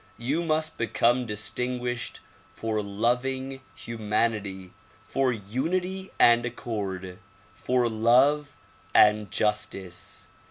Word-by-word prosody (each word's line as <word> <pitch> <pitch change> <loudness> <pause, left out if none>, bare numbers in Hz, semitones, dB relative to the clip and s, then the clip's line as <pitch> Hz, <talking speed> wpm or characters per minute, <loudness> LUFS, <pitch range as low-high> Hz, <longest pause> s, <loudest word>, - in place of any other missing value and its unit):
You 135 +9 -1
must 155 -1 -1
become 120 +1 +2
distinguished 120 +3 -3 0.3
for 110 -1 -1
loving 125 +6 -1
humanity; 105 -4 -2 0.3
for 135 -1 +1
unity 170 - -2
and 120 0 +6
accord; 100 -6 -4 0.3
for 125 -1 +1
love 130 +7 +3 0.4
and 105 -1 +5
justice. 105 -4 -2
115 Hz, 85 wpm, -27 LUFS, 105-130 Hz, 0.4 s, and